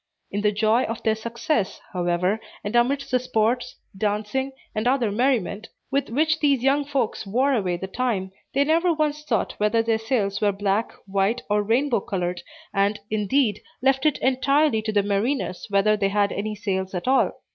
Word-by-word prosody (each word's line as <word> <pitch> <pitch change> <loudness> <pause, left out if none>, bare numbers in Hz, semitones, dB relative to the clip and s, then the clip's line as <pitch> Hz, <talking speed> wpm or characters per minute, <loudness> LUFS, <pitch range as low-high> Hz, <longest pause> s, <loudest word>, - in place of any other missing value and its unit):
In 205 - -1
the 210 0 +3
joy 215 +3 +2
of 230 0 -5
their 220 - +3
success, 230 0 -2
however, 180 +3 0 0.2
and 205 +3 -3
amidst 265 +4 +2
the 255 - +3
sports, 245 +1 0 0.2
dancing, 210 +6 -1 0.2
and 215 +2 -1
other 250 -4 +2
merriment, 225 -3 0 0.2
with 280 +1 0
which 315 +6 +1
these 280 -4 +2
young 280 +2 +3
folks 270 -7 -2
wore 260 +7 +2
away 185 -7 0
the 190 - -5
time, 195 -2 -2 0.2
they 280 - +4
never 330 +4 +3
once 300 -2 -1
thought 235 -8 -1
whether 210 +2 +2
their 225 -1 +1
sails 220 -4 -1
were 205 -1 +3
black, 200 +2 0
white, 200 +4 0
or 210 0 +3
rainbow 235 +3 +2
colored, 180 -3 -3 0.3
and, 200 +1 +1
indeed, 215 +1 +1 0.2
left 270 +2 +3
it 300 - +2
entirely 265 -1 +3
to 215 0 -2
the 205 -1 +2
mariners 205 0 -1
whether 205 +1 +3
they 200 -2 0
had 205 0 +1
any 210 +1 -3
sails 190 -3 -3
at 180 - -4
all. 265 +1 +3
220 Hz, 180 wpm, -24 LUFS, 200-265 Hz, 0.3 s, they